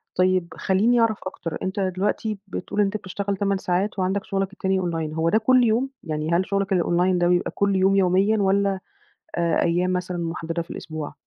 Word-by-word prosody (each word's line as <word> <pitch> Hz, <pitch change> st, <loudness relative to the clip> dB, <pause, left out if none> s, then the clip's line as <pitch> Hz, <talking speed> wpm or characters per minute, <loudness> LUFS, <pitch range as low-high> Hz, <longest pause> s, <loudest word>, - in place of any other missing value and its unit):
طيب 185 Hz, -1 st, +2 dB
خلّيني 215 Hz, +8 st, +2 dB
أعرف 225 Hz, -2 st, +2 dB
أكتر، 170 Hz, -3 st, -5 dB
أنت 190 Hz, +2 st, -3 dB
دلوقتي 195 Hz, +3 st, -1 dB
بتقول 200 Hz, +2 st, -2 dB
أنت 200 Hz, +1 st, +1 dB
بتشتغل 200 Hz, 0 st, -4 dB
8 200 Hz, -1 st, +1 dB
ساعات 190 Hz, +2 st, -1 dB
وعندك 190 Hz, +2 st, 0 dB
شُغلك 195 Hz, 0 st, -2 dB
التاني 190 Hz, -2 st, 0 dB
online، 165 Hz, -3 st, -2 dB
هو 165 Hz, +1 st, +1 dB
ده 215 Hz, -, +3 dB
كل 250 Hz, +3 st, +4 dB
يوم؟ 235 Hz, +4 st, +2 dB
يعني 155 Hz, +1 st, -3 dB
هل 175 Hz, +2 st, +2 dB
شُغلك 195 Hz, 0 st, -1 dB
الonline 180 Hz, +1 st, +2 dB
ده 175 Hz, -, +2 dB
بيبقى 175 Hz, 0 st, +1 dB
كل 200 Hz, -1 st, +1 dB
يوم 190 Hz, +1 st, +3 dB
يوميًا 195 Hz, +3 st, +3 dB
والّا 195 Hz, 0 st, +2 dB, 0.6 s
آآ، 170 Hz, -1 st, +1 dB
أيام 180 Hz, +2 st, +1 dB
مثلًا 180 Hz, 0 st, -2 dB
مُحدَّدة 170 Hz, 0 st, -3 dB
في 165 Hz, -, -9 dB
الأسبوع؟ 155 Hz, -3 st, -6 dB
190 Hz, 185 wpm, -23 LUFS, 175-200 Hz, 0.6 s, كل